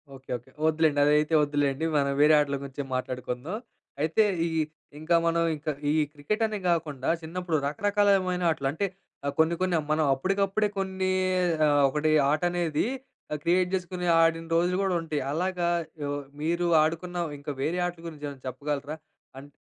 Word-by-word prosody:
Okay. 135 0 -17
Okay. 120 +2 -20 0.2
వద్దులెండి. 155 -2 +2
అదైతే 150 +2 +3
వద్దులెండి. 145 0 0
మనం 140 -1 +1
వేరే 150 +1 +6
ఆటల 140 -1 0
గురించి 140 +1 -5
మాట్లాడుకుందాం. 130 - -4 0.4
అయితే 160 +8 +3 0.2
ఈ - - -2 0.5
ఇంకా, 160 +2 +1
మనం 170 0 +2
ఇంకా 155 +1 -3 0.2
ఈ - - +2 0.2
క్రికెట్ 155 +10 -2
అనే 215 -1 -2
కాకుండా, 150 -6 -1
చిన్నప్పుడు 170 0 -2
రకరకాలమైన 195 +2 +2
ఆటలు, 140 -3 -2
అంటే 160 +7 -1 0.4
ఆహ్, 140 - -1
కొన్ని 160 +2 +4
కొన్ని 185 -2 +2
మనం 155 0 +2
అప్పడికప్పుడే 195 +8 +1
కొన్ని, 190 -1 -1 0.6
ఆహ్, 145 -1 +4
ఒకటి 150 +3 0 0.2
ఆట 155 - +1
అనేది 170 -3 0 0.5
అహ్, 150 - -2
క్రియేట్ 180 +1 +2
చేసుకొని 180 -1 -4
ఆడిన 165 0 +3
రోజులు 175 +2 +2
గూడా 190 -2 +1
ఉంటాయి. 155 -3 -3
అలాగా 180 +1 0 0.3
యో 145 - -2 0.3
మీరు 170 +3 0 0.2
ఆడుకున్న, 170 +3 -2 0.2
ఇంకా 145 +1 -5
వేరే 170 +6 0
ఆటల 175 -1 -8
గురించి 150 -3 -7
ఏమైనా 140 -2 -11
చెప్పగలరా? 145 +3 -3 0.4
అండ్ 140 +2 -10
160 Hz, 155 wpm, -27 LUFS, 145-180 Hz, 0.6 s, వేరే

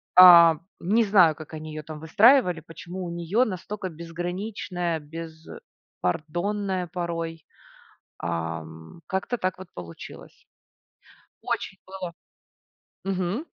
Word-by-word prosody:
А, 170 -3 +10 0.2
не 220 +6 +3
знаю, 185 -7 +5
как 155 +1 -11
они 155 0 -6
её 155 0 -6
там 155 0 -8
выстраивали, 180 - +5
почему 175 +3 -8
у - - -4
неё 170 +9 +1
настолько 190 0 -5
безграничная, 175 +1 -4
беспардонная 165 - -4
порой, 165 -2 -4 0.7
ам 80 - -5
Как-то 190 +6 -2
так 185 0 -1
вот 185 -1 -10
получилось. 85 -2 -11 1.0
Очень 195 - -3
было 185 -2 -6 0.9
Мгм. 195 - -1
175 Hz, 100 wpm, -26 LUFS, 160-190 Hz, 1.0 s, А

